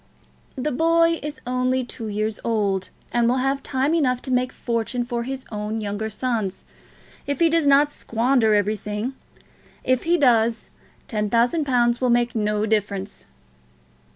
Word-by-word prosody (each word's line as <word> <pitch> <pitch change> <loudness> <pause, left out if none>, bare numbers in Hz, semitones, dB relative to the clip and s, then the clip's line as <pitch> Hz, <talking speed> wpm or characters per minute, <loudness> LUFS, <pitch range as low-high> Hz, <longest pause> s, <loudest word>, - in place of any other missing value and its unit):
"The 275 +3 -2
boy 330 +3 +3
is 295 +1 -6
only 255 +1 0
two 235 -2 -7
years 215 +1 -2
old, 200 -4 0 0.2
and 235 -1 +2
will 250 - +2
have 270 +1 0
time 270 +3 0
enough 255 -7 +2
to 260 - -5
make 250 0 +1
fortunes 240 +1 -2
for 240 -1 -2
his 265 +2 -5
own 210 +1 -3
younger 210 +1 -3
sons, 215 -4 -2 0.6
if 285 -1 -2
he 335 - +5
does 330 -3 +2
not 285 +1 +5
squander 230 -3 +1
everything. 210 +3 -1 0.7
If 255 -1 +2
he 345 +1 +3
does, 235 -5 +2 0.3
the - - -34
ten 210 -3 -2
thousand 240 +8 +2
pounds 240 -2 +2
will 255 - +2
make 240 0 +2
no 210 -1 0
difference." 205 -2 -2
240 Hz, 155 wpm, -23 LUFS, 215-265 Hz, 0.7 s, he